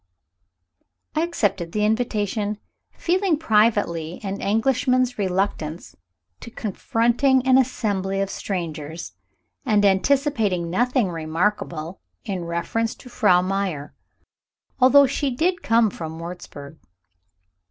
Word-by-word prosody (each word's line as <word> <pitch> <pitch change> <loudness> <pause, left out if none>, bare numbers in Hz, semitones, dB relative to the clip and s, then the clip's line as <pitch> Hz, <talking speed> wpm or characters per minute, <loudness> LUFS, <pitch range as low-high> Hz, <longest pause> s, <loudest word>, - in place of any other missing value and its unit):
I 310 - +1
accepted 200 - -1
the 210 0 +1
invitation, 215 -2 -1 0.3
feeling 360 -2 +1
privately 210 - +1
an 195 0 -4
Englishman's 250 +2 +1
reluctance 185 -4 -2 0.4
to - - -9
confronting 240 +5 +1
an 260 0 +6
assembly 200 -6 -1
of 195 0 -1
strangers, 165 -4 -5 0.5
and 210 -5 +3
anticipating 200 - +1
nothing 245 0 +1
remarkable 165 +1 -2 0.2
in 190 -5 -3
reference 170 +7 -2
to 250 - -14
Frau 195 -7 +3
Meyer, 185 -7 -2 0.9
although 275 +2 +7
she 275 +1 -1
did 340 +8 0
come 225 -2 +3
from 160 -2 -7
Wurzburg. 165 -3 -9
205 Hz, 100 wpm, -23 LUFS, 175-250 Hz, 0.9 s, although